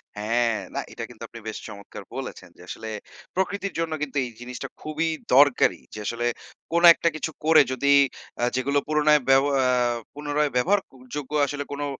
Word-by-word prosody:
হ্যাঁ, 115 Hz, +3 st, +1 dB, 0.2 s
না -, -, 0 dB
এটা -, -, -6 dB
কিন্তু -, -, -12 dB
আপনি 115 Hz, -, -11 dB
বেশ 110 Hz, -, -4 dB
চমৎকার 100 Hz, -2 st, -10 dB
বলেছেন। -, -, -7 dB
যে -, -, -15 dB
আসলে 110 Hz, -, -7 dB, 0.5 s
প্রকৃতির 200 Hz, +1 st, -1 dB
জন্য 165 Hz, -1 st, -1 dB
কিন্তু 145 Hz, -1 st, -3 dB
এই -, -, -6 dB
জিনিসটা 125 Hz, +1 st, -6 dB
খুবই 155 Hz, +2 st, -2 dB, 0.3 s
দরকারি। 145 Hz, -1 st, +5 dB
যে 105 Hz, -, -7 dB
আসলে 120 Hz, +2 st, -2 dB, 0.5 s
কোনো 170 Hz, +1 st, +4 dB
একটা 170 Hz, -, +1 dB
কিছু 160 Hz, +1 st, -3 dB
করে 160 Hz, 0 st, +7 dB
যদি 130 Hz, +2 st, -1 dB, 0.5 s
আ -, -, +1 dB
যেগুলো 140 Hz, +3 st, +1 dB
পুনরায় 150 Hz, -1 st, +4 dB
ব্যাব 135 Hz, +1 st, +6 dB, 0.2 s
আ -, -, +2 dB, 0.5 s
পুনরায় 145 Hz, 0 st, -1 dB
ব্যবহারযোগ্য 135 Hz, -3 st, -1 dB
আসলে 145 Hz, 0 st, -4 dB
কোনো 145 Hz, 0 st, -3 dB
145 Hz, 165 wpm, -25 LUFS, 125-155 Hz, 0.5 s, করে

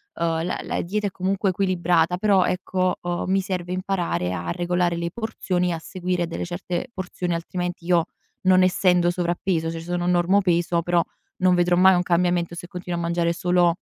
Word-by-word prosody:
Uhm, 165 Hz, -1 st, 0 dB
la 180 Hz, -, -2 dB
la -, -, -2 dB
dieta 205 Hz, +4 st, -2 dB
è -, -, -5 dB
comunque 195 Hz, +2 st, 0 dB
equilibrata, 180 Hz, -2 st, +1 dB
però, 195 Hz, -1 st, +3 dB
ecco, 185 Hz, 0 st, -1 dB
uhm, 175 Hz, 0 st, -2 dB
mi 195 Hz, -, +3 dB
serve 185 Hz, -2 st, -3 dB
imparare 180 Hz, -, -1 dB
a 85 Hz, -1 st, -3 dB
regolare 175 Hz, -, 0 dB
le 170 Hz, 0 st, -2 dB
porzioni 190 Hz, -6 st, -2 dB
e -, -, 0 dB
a 165 Hz, -, -4 dB
seguire 180 Hz, 0 st, -2 dB
delle 165 Hz, -, -4 dB
certe 175 Hz, +3 st, -4 dB
porzioni, 180 Hz, -2 st, -3 dB
altrimenti 175 Hz, +1 st, -4 dB
io, 170 Hz, -2 st, +3 dB, 0.4 s
non 185 Hz, 0 st, +5 dB
essendo 180 Hz, -1 st, +3 dB
sovrappeso, 175 Hz, -1 st, -1 dB
cioè, 165 Hz, -, -5 dB
sono 175 Hz, +1 st, -2 dB
normopeso 175 Hz, -1 st, +2 dB
però 175 Hz, 0 st, +2 dB, 0.4 s
non 185 Hz, -1 st, +3 dB
vedrò 175 Hz, 0 st, +3 dB
mai 185 Hz, +1 st, +6 dB
un 175 Hz, -, +1 dB
cambiamento 175 Hz, -1 st, +1 dB
se 175 Hz, -, -8 dB
continuo 180 Hz, -2 st, -5 dB
a -, -, -2 dB
mangiare 170 Hz, 0 st, 0 dB
solo 175 Hz, -1 st, +2 dB
175 Hz, 180 wpm, -23 LUFS, 170-185 Hz, 0.4 s, mai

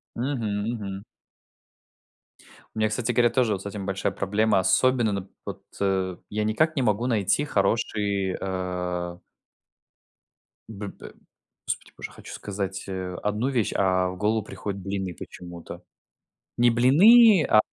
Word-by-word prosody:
Мгм, 115 Hz, -5 st, -2 dB
мгм. 100 Hz, -4 st, -5 dB, 1.7 s
У -, -, -4 dB
меня, 110 Hz, 0 st, +2 dB
кстати 115 Hz, +2 st, -1 dB
говоря, 120 Hz, 0 st, +3 dB
тоже 125 Hz, -5 st, +2 dB
вот 95 Hz, -1 st, -4 dB
с -, -, -21 dB
этим 100 Hz, -1 st, -5 dB
большая 95 Hz, 0 st, -1 dB
проблема. 105 Hz, +1 st, +1 dB
Особенно 125 Hz, +4 st, +3 dB
н 100 Hz, -2 st, -3 dB, 0.2 s
вот, -, -, -7 dB, 0.2 s
э, 95 Hz, -2 st, 0 dB
я 105 Hz, +1 st, -1 dB
никак 155 Hz, +10 st, +1 dB
не 135 Hz, -, +1 dB
могу 110 Hz, +2 st, +1 dB
найти 110 Hz, +3 st, +1 dB
хороший, 100 Hz, -4 st, 0 dB
а 90 Hz, -2 st, -3 dB, 1.5 s
Б 105 Hz, -2 st, -6 dB
б -, -, -11 dB, 0.5 s
Господи -, -, -4 dB
боже, -, -, -6 dB
хочу -, -, -11 dB
сказать, 100 Hz, -1 st, -4 dB
а, 95 Hz, -1 st, -4 dB
одну 105 Hz, +5 st, 0 dB
вещь, 125 Hz, -6 st, 0 dB
а 95 Hz, -1 st, +2 dB
в 90 Hz, -, -6 dB
голову 105 Hz, +3 st, +1 dB
приходят 100 Hz, -1 st, -6 dB
блины 95 Hz, -1 st, -3 dB
почему-то. 85 Hz, +1 st, -10 dB, 0.8 s
Не 120 Hz, 0 st, +5 dB
блины, 180 Hz, -, +7 dB
а, 110 Hz, -, +7 dB
105 Hz, 140 wpm, -25 LUFS, 95-115 Hz, 1.7 s, блины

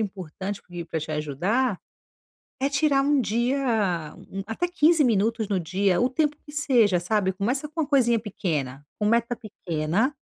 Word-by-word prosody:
importante 195 Hz, -1 st, -5 dB, 0.3 s
pra 160 Hz, -, -2 dB
te 155 Hz, -, -6 dB
ajudar, 180 Hz, -, 0 dB, 0.8 s
é 275 Hz, -, +2 dB
tirar 275 Hz, -1 st, +3 dB
um 285 Hz, 0 st, +3 dB
dia 225 Hz, -, 0 dB, 0.3 s
até 225 Hz, +11 st, -1 dB
15 330 Hz, -2 st, +4 dB
minutos 225 Hz, -1 st, +1 dB
no 195 Hz, -3 st, 0 dB
dia, 185 Hz, +2 st, +1 dB
o 250 Hz, -, +3 dB
tempo 300 Hz, +2 st, +1 dB
que 295 Hz, -, -12 dB
seja, 240 Hz, -11 st, +3 dB
sabe, 190 Hz, +1 st, +1 dB
começa 250 Hz, +10 st, -1 dB
com 320 Hz, +2 st, -2 dB
uma -, -, -2 dB
coisinha 240 Hz, -5 st, +3 dB
pequena, 160 Hz, -, -3 dB, 0.2 s
com 210 Hz, -, -1 dB
meta 235 Hz, +2 st, +2 dB
pequena, 195 Hz, -, -1 dB
220 Hz, 150 wpm, -25 LUFS, 185-270 Hz, 0.8 s, 15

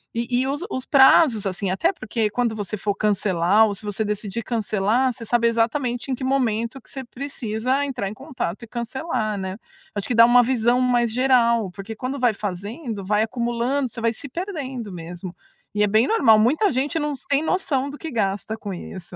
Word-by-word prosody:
E 235 Hz, +1 st, -1 dB, 0.2 s
e 260 Hz, -, -1 dB
os 285 Hz, +3 st, -2 dB
os 260 Hz, 0 st, -3 dB
prazos, 265 Hz, -5 st, +6 dB
assim, 190 Hz, 0 st, -2 dB
até 330 Hz, -, +1 dB
porque 220 Hz, -, -2 dB
quando 235 Hz, -1 st, 0 dB
você 210 Hz, 0 st, -3 dB
for 205 Hz, 0 st, -1 dB
cancelar 200 Hz, 0 st, +3 dB
ou 205 Hz, -, -3 dB
se 210 Hz, -, -10 dB
você 205 Hz, +1 st, -1 dB
decidir 210 Hz, +1 st, -3 dB
cancelar, 225 Hz, +3 st, +1 dB
você 235 Hz, -, -9 dB
sabe 235 Hz, +1 st, +2 dB
exatamente 240 Hz, +2 st, 0 dB
em -, -, +1 dB
que 260 Hz, -, -8 dB
momento 255 Hz, -1 st, 0 dB
que -, -, -14 dB
você 270 Hz, -, -6 dB
precisa 255 Hz, 0 st, -2 dB
entrar 245 Hz, -8 st, -3 dB
em -, -, -7 dB
contato 245 Hz, -, -5 dB
e -, -, -9 dB
cancelar, 235 Hz, -2 st, -3 dB
né? 190 Hz, -1 st, -4 dB, 0.4 s
Acho 205 Hz, -, -4 dB
que 245 Hz, -, -1 dB
dá 230 Hz, 0 st, +9 dB
uma 245 Hz, +1 st, +6 dB
visão 245 Hz, 0 st, +2 dB
mais 240 Hz, -2 st, +2 dB
geral, 235 Hz, -4 st, +3 dB
porque 200 Hz, +4 st, -8 dB
quando 260 Hz, +5 st, -4 dB
vai 245 Hz, -3 st, +3 dB
fazendo, 205 Hz, -, -5 dB
vai 210 Hz, +2 st, +2 dB
acumulando, 240 Hz, +4 st, -1 dB
você 235 Hz, -, -7 dB
vai 230 Hz, 0 st, +2 dB
se 235 Hz, +5 st, -6 dB
perdendo 270 Hz, -, -5 dB
mesmo. 175 Hz, +1 st, -7 dB, 0.4 s
E 210 Hz, -, +3 dB
é 210 Hz, -, +3 dB
bem 220 Hz, +4 st, +3 dB
normal, 225 Hz, -, +5 dB
muita 300 Hz, -, +3 dB
gente 280 Hz, +6 st, -1 dB
não 295 Hz, -2 st, -1 dB
sem 280 Hz, +2 st, -1 dB
noção 290 Hz, -6 st, 0 dB
do 290 Hz, -, -9 dB
que 325 Hz, -, -6 dB
gasta 215 Hz, -3 st, -2 dB
com 205 Hz, -3 st, -6 dB
isso. 180 Hz, 0 st, -8 dB
235 Hz, 200 wpm, -23 LUFS, 210-260 Hz, 0.4 s, dá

